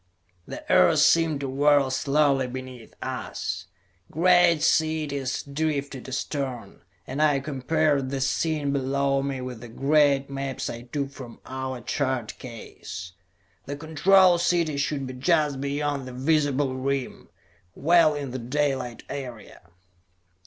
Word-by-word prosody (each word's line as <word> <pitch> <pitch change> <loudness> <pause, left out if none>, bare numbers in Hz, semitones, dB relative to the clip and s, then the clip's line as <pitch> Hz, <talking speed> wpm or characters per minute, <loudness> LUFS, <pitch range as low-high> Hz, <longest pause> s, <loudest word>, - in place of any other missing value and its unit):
The - - -8
earth - - +5
seemed 160 -4 +4
to 140 - -2
whirl 140 0 +3
slowly 140 0 +2
beneath 130 -2 -9
us. 90 +1 -4 0.4
Great 175 -1 +4
cities 150 -4 0
drifted 140 -2 -3
astern, 130 -2 -4 0.2
and 135 +3 -3
I 145 -2 +4
compared 145 0 0
the 135 0 -3
scene 145 +1 0
below 140 0 +1
me 135 -1 -3
with 125 -3 -7
the 120 - -8
great 140 +2 +2
maps 135 -1 -4
I 120 - -7
took 140 +3 -4
from 125 -4 -11
our 130 -1 -5
chart 130 -2 -2
case. 100 -6 -9 0.6
The 140 +1 -4
Control 175 +4 +4
City 170 -3 +1
should 140 -1 -1
be 130 - -6
just 145 0 +1
beyond 140 -1 -2
the 130 - -8
visible 140 -1 +1
rim; 135 0 -3 0.5
well 165 -1 +4
in 140 -3 -4
the 130 - -4
daylight 130 -1 -2
area. 125 -10 -8
140 Hz, 130 wpm, -25 LUFS, 130-150 Hz, 0.6 s, earth